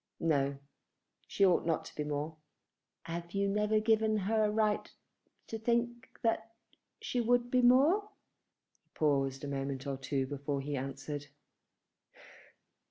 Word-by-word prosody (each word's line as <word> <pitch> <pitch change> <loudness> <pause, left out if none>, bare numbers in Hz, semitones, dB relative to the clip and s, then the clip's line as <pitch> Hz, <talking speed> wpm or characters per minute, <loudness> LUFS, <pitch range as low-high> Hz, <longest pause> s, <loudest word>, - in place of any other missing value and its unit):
No; 140 -4 +1 0.7
she 200 - +3
ought 180 -2 +4
not 165 -1 0
to - - -11
be 150 - -2
more." 150 +2 -3 0.7
"Have 170 +1 -6
you 200 0 +1
never 210 +2 +2
given 220 0 +3
her 215 +2 +1
a - - +2
right 210 -1 +1 0.5
to 225 - -5
think 235 0 0
that 225 0 0 0.4
she 245 - -1
would 245 +1 +2
be 255 - +4
more?" 290 +12 +5 0.7
He - - -44
paused 135 -3 +1
a - - -3
moment 135 -1 -3
or 140 -1 -2
two 135 0 -1
before 140 +1 -3
he 145 +1 -3
answered. 135 +2 -5
180 Hz, 140 wpm, -32 LUFS, 140-225 Hz, 0.7 s, more